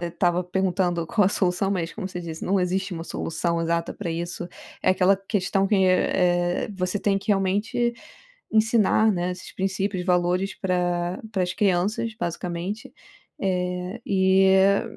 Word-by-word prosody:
é 175 - -2
estava 175 +1 +1
perguntando 180 -2 0
qual 210 +2 +2
é - - +4
a - - +5
solução, 190 -1 0
mas 170 -4 -2
como 195 -3 -5
você 180 - -6
disse, 165 -2 -6
não 195 +1 +2
existe 185 +2 -1
uma 165 -1 -5
solução 170 0 -2
exata 170 0 -1
pra 180 -5 -4
isso, 175 +1 -4 0.3
é - - +4
aquela 185 +1 +4
questão 195 0 0
que 210 - +2
é 180 -1 +2
é - - -7
você 185 +1 -2
tem 195 -1 +1
que 195 - -15
realmente 205 +4 +1 0.6
ensinar, 220 -1 +3
né, 180 -1 -1
esses 180 +1 -9
princípios, 190 -1 -2
valores 180 +1 +1
para 175 0 -1
para 195 -4 0
as 180 - -2
crianças, 210 +4 0
basicamente, 175 +3 -4 0.5
eh, 180 +2 -2
e 190 0 +3
é 195 +1 +4
185 Hz, 165 wpm, -24 LUFS, 175-195 Hz, 0.6 s, a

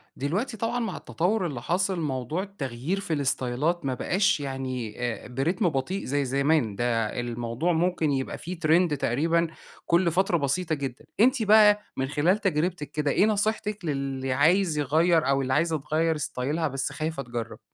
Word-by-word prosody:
دلوقتي 195 - -2
طبعًا 230 +3 -1
مع 230 - -3
التطور 185 +3 -1
اللي 135 -7 -4
حاصل، 185 +4 0
موضوع 145 +3 -2
التغيير 155 -2 -4
في 170 -5 -3
الاستايلات 140 +4 0
ما 135 - 0
بقاش 185 +8 +1
يعني 130 -5 -4
آآ، 120 -2 -3
برتم 160 - 0
بطيء 155 +7 -2
زي 140 +1 0
زمان، 140 -4 +1
ده 115 0 0
الموضوع 120 +7 -1
ممكن 165 -2 +1
يبقى 135 -1 -2
فيه 175 +1 -7
trend 165 -1 +3
تقريبًا 165 +8 +1 0.4
كل 170 0 +3
فترة 180 +1 +2
بسيطة 160 +3 0
جدًا. 135 -3 -6
أنتِ 250 +2 +4
بقى 210 0 +6 0.2
من 135 - 0
خلال 150 +7 +2
تجربتِك 180 -5 -1
كده، 150 -2 0
إيه 200 - +4
نصيحتِك 210 -2 -1
للي 135 -3 -2
عايز 165 +4 +3
يغيّر، 160 +2 +3
أو 140 0 +2
اللي 130 0 -1
عايزة 160 +2 +2
تغيّر 160 +3 0
استايلها 150 +2 -2
بس 135 +1 -3
خايفة 155 0 -3
تجرب؟ 120 -2 -6
155 Hz, 160 wpm, -26 LUFS, 135-180 Hz, 0.4 s, بقى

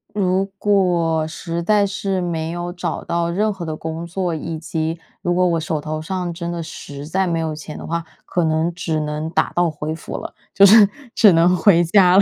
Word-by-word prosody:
如 190 -1 +1
果， 175 -6 +2
实 165 +1 -4
在 205 +3 +3
是 195 -1 -2
没 165 -2 -2
有 175 +1 -4
找 175 0 -4
到 170 0 -1
任 210 +5 +1
何 190 -4 -6
的 155 -1 -3
工 160 +1 -5
作， 180 0 -2
以 160 +1 -4
及， 160 0 -3 0.2
如 175 0 0
果 180 0 +3
我 170 -2 +2
手 155 -1 -2
头 155 +1 -4
上 180 +1 -3
真 170 0 -5
的 170 -1 -4
实 145 -2 -8
在 190 +4 0
没 170 -1 0
有 160 -1 -2
钱 150 0 -8
的 - - -8
话， 170 +1 -2 0.2
可 175 -2 0
能 160 +2 +1
只 160 -2 -2
能 150 +1 -3
打 - - +1
道 175 -1 +2
回 155 0 -4
府 160 - -7
了。 - - -6 0.2
就 200 - +7
是， 210 +1 +8 0.3
只 210 -5 +6
能 170 +2 +4
回 175 0 +5
家 180 +1 +5
了。 - - +8
170 Hz, 230 characters per minute, -20 LUFS, 160-185 Hz, 0.3 s, 是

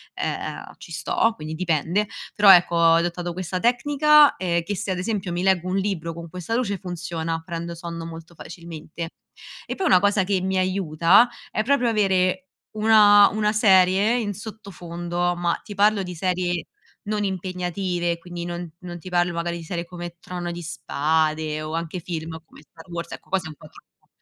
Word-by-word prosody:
ehm, - - -4
ci - - -13
sto, 225 - +1
quindi 155 +1 -7
dipende, 175 +4 0 0.3
però 205 -2 +8
ecco 175 -1 +4
ho 165 -1 +5
adottato 175 +1 -1
questa 185 +1 -4
tecnica, 290 +5 +5
ehm, 170 -2 0
che 205 +4 -3
se 200 0 -3
ad 185 - -1
esempio 190 -1 -2
mi 175 +1 -2
leggo 185 -2 +2
un 185 - 0
libro 190 -4 -2
con 170 0 -8
questa 180 +6 -5
luce, 230 -5 0
funziona, 165 -3 -4
prendo 170 -1 -5
sonno 170 -1 -6
molto 165 +1 -10
facilmente. 165 -1 -8 0.6
E - - -4
poi 380 - -2
una 185 - +5
cosa 200 -1 +2
che 190 -1 0
mi 190 0 -1
aiuta, 185 +3 +4 0.2
è 215 - -1
proprio 250 0 +2
avere 190 -4 +2 0.4
una 210 -2 +7
una 210 0 0
serie 200 +2 +4
in 205 -3 -2
sottofondo, 175 -4 -4
ma 175 -1 -1
ti 205 - -8
parlo 205 0 +3
di 180 -1 -6
serie 175 0 -1 0.4
non 210 0 -2
impegnative, 180 -2 -2
quindi 175 0 -7
non 175 0 -5
non 175 -1 -8
ti 185 - -10
parlo 175 0 +1
magari 170 0 -2
di 170 - -8
serie 170 +1 -4
come 175 -1 -8
Trono 175 -1 -5
di 175 - -6
Spade 155 -1 -1
o 155 +1 -5
anche 165 +2 -3
film 160 -1 -5
come - - -17
Star 165 +3 -17
Wars, 170 0 -5
ecco - - -11
quasi 190 -3 0
è - - -7
un 155 - -10
po' 155 - -14
troppo. - - -22
180 Hz, 185 wpm, -23 LUFS, 170-200 Hz, 0.6 s, però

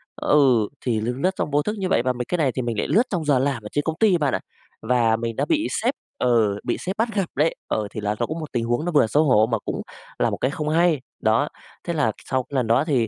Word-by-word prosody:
ừ, 130 -7 +3 0.2
thì 115 -4 +1
lướt 120 +3 -1
lướt 185 +5 +2
trong 150 - -2
vô 145 +1 +3
thức 210 +8 -2
như 190 -2 -2
vậy, - - +3
và 130 0 +1
mấy 125 0 -4
cái 180 - -1
này 145 -6 +2
thì 130 - -3
mình 120 -3 -3
lại - - 0
lướt 225 - +4
trong 175 -5 -2
giờ 145 -3 +3
làm 135 -4 -1
ở - - -6
trên 145 - +1
công 160 +1 -2
ty 210 -5 +4
bạn 145 -4 0
ạ - - -1 0.4
và 115 -1 +2
mình 115 0 -3
đã - - 0
bị 320 -1 +1 0.2
sếp 250 +4 +2 0.3
ừ, 110 -5 +2
bị 120 - -1
sếp 190 +1 -4
bắt 225 +2 +1
gặp 195 -2 +1
đấy. 155 +4 +2
Ờ, 105 -1 -1
thì 110 - -5
là 105 0 -1
ló 120 - +1
cũng 160 +6 -5
một 155 -2 -7
tình 120 -2 -1
huống 120 +6 0
nó 175 - -1
vừa 145 -8 +4
xấu 150 +7 +3
hổ 110 -7 +4
mà 115 - +2
cũng - - -4 0.4
là - - +3
một - - -3
cái 130 - 0
không 150 +1 -3
hay, 165 -2 +3 0.2
đó. 110 +6 +2 0.4
Thế 170 - -3
là 150 -9 +1
sau 130 -1 0
cái 140 - -10
lần 125 -3 +1
đó 115 +5 +3
thì, 130 -8 +1
135 Hz, 295 wpm, -23 LUFS, 115-160 Hz, 0.4 s, lướt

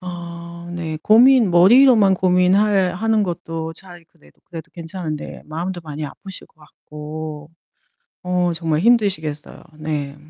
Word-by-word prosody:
아 170 -1 -9
네. 160 -2 -5
고민 240 0 +5
머리로만 210 +4 +6
고민할 185 +1 +2
하는 220 +2 +1
것도 165 -3 -5
차라리 175 0 -11
그래도 165 -1 -26
그래도 165 -2 -10
괜찮은데 165 -2 -7
마음도 175 +4 -5
많이 155 -1 -6
아프실 190 +6 -10
것 - - -37
같고 150 0 -9 0.7
어 180 -1 0
정말 160 -2 -1
힘드시겠어요. 190 -9 0 0.2
네. 150 -2 -4
175 Hz, 285 characters per minute, -20 LUFS, 155-190 Hz, 0.7 s, 머리로만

